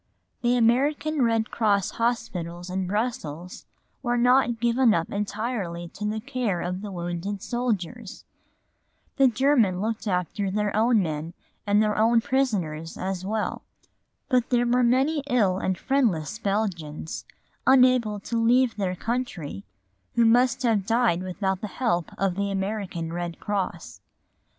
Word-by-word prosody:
The 245 0 +2
American 280 +6 +2
Red 225 -2 +1
Cross 205 -4 +1
hospitals 180 -7 -2
in 185 0 -2
Brussels 180 -6 -4 0.3
were 245 -2 0
not 245 -1 +3
given 235 0 +3
up 165 - -2
entirely 200 -4 -3
to 210 - -7
the 215 +1 -2
care 245 -6 -2
of 180 +2 -3
the 205 -1 -6
wounded 175 +3 -4
soldiers. 235 -3 -3 0.9
The 270 - +6
Germans 235 -6 +3
looked 220 +2 -3
after 190 +1 -1
their 210 +1 -1
own 220 -1 +3
men 160 +1 -4 0.3
and 205 +1 +4
their 220 +2 +3
prisoners 195 -12 -1
as 185 -1 -3
well. 215 +3 -2 0.7
But 250 -3 +1
there 245 -1 +2
were 245 +1 +3
many 265 +6 +2
ill 200 -7 +2
and 190 -1 -1
friendless 220 - 0
Belgians, 185 -8 -3 0.4
unable 255 -5 +4
to 230 +2 -1
leave 245 0 +3
their 185 -3 -1
country, 180 - -4 0.5
who 235 - +4
must 245 +3 +3
have 225 -5 +2
died 230 -7 +2
without 190 +1 -2
the 215 - -3
help 200 -6 -1
of 195 -2 +1
the 200 +2 -2
American 195 -4 -3
Red 175 -1 -4
Cross. 185 - -4
210 Hz, 135 wpm, -25 LUFS, 185-240 Hz, 0.9 s, The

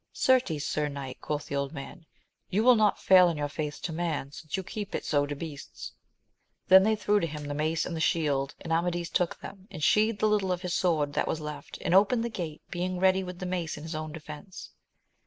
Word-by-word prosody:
Certes, 245 - +2
sir 150 -1 0
knight, 140 -2 -7
quoth 150 -1 -3
the - - -4
old 140 +1 -2
man, 155 +3 -9 0.4
you 210 +4 +1
will 250 +1 +8
not 215 -3 +3
fail 185 -2 +6
in 165 - -3
your 145 0 -1
faith 150 0 -4
to 165 - -3
man, 160 -4 -2
since 155 +2 -5
you 190 - -3
keep 205 +2 -5
it - - -3
so 145 -1 +2
to 145 - -4
beasts. 145 -1 -8 0.8
Then 190 0 +10
they 220 +3 +3
threw 210 0 +2
to 165 - -1
him 150 -1 -6
the 145 - -3
mace 155 +2 0
and 165 -2 -4
shield, 145 -4 +1
and 165 - -2
Amadis 175 0 0
took 175 -2 0
them, 195 -1 -10
and 155 - -7
sheathed 215 +4 +3
the 215 - +2
little 205 -3 +1
of 180 +1 -2
his 180 -1 -2
sword 155 -6 +1
that - - 0
was 160 - -1
left, 150 -1 -7
and 175 - 0
opened 210 +5 +4
the - - -2
gate, 170 -8 -6
being 180 +1 -2
ready 190 0 +3
with 180 -1 -7
the 185 - -5
mace 180 -4 -2
in 150 - -9
his 160 +1 -5
own 155 0 -4
defence. 155 +4 -9
165 Hz, 230 wpm, -28 LUFS, 150-190 Hz, 0.8 s, Then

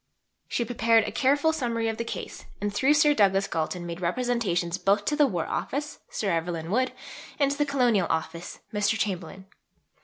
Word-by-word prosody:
She 235 - -1
prepared 230 -2 +3
a - - -3
careful 285 +4 +2
summary 235 -6 -1
of 225 -1 -2
the 235 - -2
case, 230 - -7
and 205 0 -2
through 265 +8 +3
Sir 295 0 +5
Douglas 195 -5 +3
Galton 170 +2 -2
made 170 +1 -6
representations 180 -3 0
both 200 +1 +2
to 300 - +1
the 295 -1 +5
War 175 -9 -2
Office 290 +1 -3
(Sir 200 -3 -1
Evelyn 165 0 -2
Wood) 255 +4 +2 0.5
and 280 -2 +2
to 280 - -3
the 295 - +2
Colonial 245 -10 +2
Office 165 +1 -3
(Mr. 210 +1 +1
Chamberlain). 190 -2 -3
215 Hz, 180 wpm, -27 LUFS, 180-260 Hz, 0.5 s, Sir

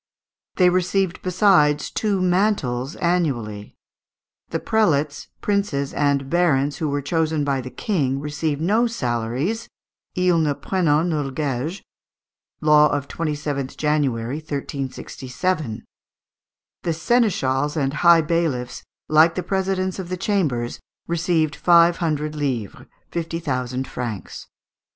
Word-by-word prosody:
They 180 -1 +5
received, 185 0 0
besides, 180 -6 +3
two 200 -4 0
mantles 175 - +1
annually. 130 -13 -1 0.7
The - - -2
prelates, 150 -10 +1
princes, 200 -10 -1
and 140 -2 +1
barons 145 -4 +2
who 155 - -1
were 140 0 -2
chosen 160 0 0
by 140 -2 0
the 130 - -7
King 135 - -1
received 150 0 -2
no 215 +8 +3
salaries 130 - -2 0.5
ils 180 -3 +3
ne 145 -2 +1
prennent 170 -2 +1
nuls 145 -3 -1
guaiges 150 +5 -2 0.8
(law 150 -1 +6
of 140 -1 -2
27th 145 -4 -3
January, 140 -4 0
1367). 140 -1 -4 1.0
The 170 - -1
seneschals 160 - +1
and 135 -2 0
high 170 +1 +6
bailiffs, 155 -6 -1 0.3
like 160 +2 +5
the 180 - -2
presidents 190 0 -1
of 180 -2 -5
the 185 - -3
chambers, 150 - -1 0.3
received 165 -2 +1
five 170 -1 +5
hundred 155 -3 -1
livres 130 -9 -3 0.2
fifty 165 -1 -3
thousand 130 -5 -3
francs. 115 -6 -6
155 Hz, 115 wpm, -22 LUFS, 140-175 Hz, 1.0 s, law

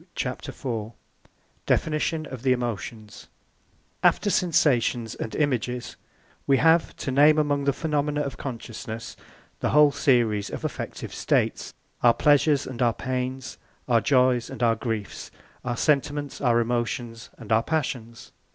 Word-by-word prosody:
] - - -41
CHAPTER - - -4
IV 115 -3 -5 0.7
DEFINITION 155 0 0
OF 130 -5 -8
THE 130 0 +3
EMOTIONS 115 -3 -5 0.7
After 205 - +3
sensations 125 - +2
and 110 - -6
images, 125 -4 -1 0.5
we 135 - +4
have 165 +2 +3
to 135 - -4
name 150 +3 +5
among 145 -2 +1
the 140 - +3
phenomena 150 0 -1
of 140 -5 -4
consciousness, 115 -2 -7 0.4
the - - 0
whole 150 0 +6
series 115 -7 +2
of - - -6
affective - - -5
states - - -1 0.3
our 120 -1 +5
pleasures 145 -1 +3
and 130 -2 -7
our 120 -2 +3
pains, 130 0 -4 0.3
our 120 -3 +3
joys 125 -3 +2
and 125 -3 -5
our 115 -1 +4
griefs, 110 -2 -5 0.3
our 120 -1 -3
sentiments, 145 -1 0
our 120 -3 +3
emotions, 120 0 -2
and 115 -2 -10
our 110 +1 +5
passions. 120 -6 -4
125 Hz, 140 wpm, -25 LUFS, 115-145 Hz, 0.7 s, whole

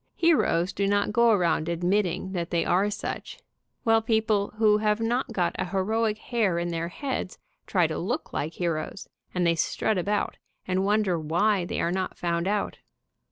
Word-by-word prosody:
Heroes 195 - +2
do 200 - 0
not 205 +1 +1
go 235 0 +5
around 175 -6 +2
admitting 180 +2 0
that 175 -3 -3
they 170 -1 0
are 195 +4 +2
such, 210 - -5 0.5
while 225 -1 +4
people 220 -2 +1
who 215 -1 +4
have 210 0 +1
not 240 +3 0
got 180 -6 0
a - - 0
heroic 210 +4 0
hair 215 -6 0
in 170 0 -1
their 165 0 -2
heads 255 0 -4 0.3
try - - +3
to - - -2
look - - -3
like 155 +3 -2
heroes, 170 +1 -3 0.3
and 180 -1 +1
they 170 - +4
strut 185 +4 0
about, 205 +4 -1 0.3
and 185 +1 +1
wonder 200 -4 +2
why 175 +5 +1
they - - -3
are 170 - +1
not 185 0 -2
found 170 0 -1
out. 205 0 -1
195 Hz, 175 wpm, -26 LUFS, 175-215 Hz, 0.5 s, go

